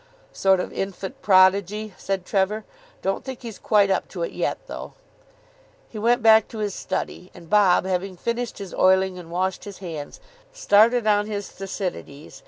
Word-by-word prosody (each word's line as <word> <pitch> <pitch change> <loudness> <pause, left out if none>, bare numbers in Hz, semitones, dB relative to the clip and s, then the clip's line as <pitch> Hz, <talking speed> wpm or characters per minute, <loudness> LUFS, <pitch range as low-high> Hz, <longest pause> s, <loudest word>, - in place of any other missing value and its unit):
"Sort 190 -1 +3
of - - -4
infant 195 +7 -5
prodigy," 200 +2 +3
said 195 -2 -3
Trevor. 205 +3 0 0.4
"Don't 195 0 -1
think 260 -2 -8
he's 230 -3 -8
quite 205 -2 +3
up - - 0
to - - -5
it - - -3
yet, - - -2
though." - - -8 1.0
He 215 - -7
went 240 +2 +2
back 220 -1 +6
to 225 - -10
his 210 -2 -2
study, 185 -1 -4
and 170 -2 -13
Bob, 195 -4 +4
having 185 0 -2
finished 235 +3 -3
his 195 -3 -8
oiling 190 0 +3
and 170 -2 -11
washed 185 +2 -2
his 200 -2 -8
hands, 165 - -7 0.3
started 235 - +4
on 205 -1 +3
his 205 -2 -4
Thucydides. 185 -6 -6
195 Hz, 170 wpm, -23 LUFS, 185-215 Hz, 1.0 s, back